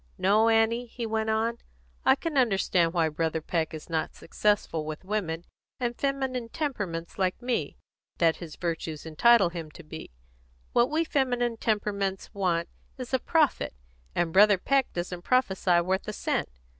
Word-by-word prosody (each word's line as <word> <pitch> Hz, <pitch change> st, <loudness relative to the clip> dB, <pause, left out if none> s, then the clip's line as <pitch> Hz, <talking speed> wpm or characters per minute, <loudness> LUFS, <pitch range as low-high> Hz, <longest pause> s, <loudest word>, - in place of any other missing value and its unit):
No, 215 Hz, +4 st, +4 dB
Annie," 225 Hz, +2 st, +2 dB
he 235 Hz, 0 st, -5 dB
went 220 Hz, 0 st, -1 dB
on, 225 Hz, +2 st, 0 dB, 0.5 s
"I -, -, +6 dB
can 330 Hz, -3 st, -4 dB
understand 195 Hz, -8 st, +3 dB
why 165 Hz, -2 st, +2 dB
Brother 160 Hz, +1 st, -1 dB
Peck 160 Hz, 0 st, -1 dB
is 155 Hz, -2 st, -8 dB
not 160 Hz, -2 st, -1 dB
the -, -, -21 dB
success 205 Hz, +4 st, +1 dB
with 155 Hz, +1 st, -4 dB
women, 175 Hz, -5 st, -2 dB, 0.3 s
and 240 Hz, -1 st, -1 dB
feminine 265 Hz, -3 st, -2 dB
temperaments 200 Hz, -, -4 dB
like 185 Hz, -1 st, +1 dB
me, 245 Hz, -1 st, -2 dB, 0.4 s
that 165 Hz, -2 st, +3 dB
his 165 Hz, -3 st, -9 dB
virtues 165 Hz, -3 st, -4 dB
entitle 195 Hz, +5 st, +5 dB
him 170 Hz, -2 st, -6 dB
to 170 Hz, -, -13 dB
be. 160 Hz, +1 st, -9 dB, 0.6 s
What 240 Hz, +1 st, +4 dB
we 315 Hz, +2 st, +1 dB
feminine 245 Hz, -6 st, 0 dB
temperaments 200 Hz, -3 st, -1 dB
want 175 Hz, -4 st, 0 dB, 0.3 s
is 255 Hz, 0 st, -7 dB
a 260 Hz, -, +3 dB
prophet, 305 Hz, -, +1 dB, 0.4 s
and 170 Hz, -2 st, 0 dB
Brother 205 Hz, +1 st, +7 dB
Peck 270 Hz, +7 st, +1 dB
doesn't 175 Hz, 0 st, -4 dB
prophesy 190 Hz, -6 st, +2 dB
worth 190 Hz, +3 st, -1 dB
a 210 Hz, -, -3 dB
cent. -, -, -1 dB
200 Hz, 160 wpm, -28 LUFS, 170-240 Hz, 0.6 s, Brother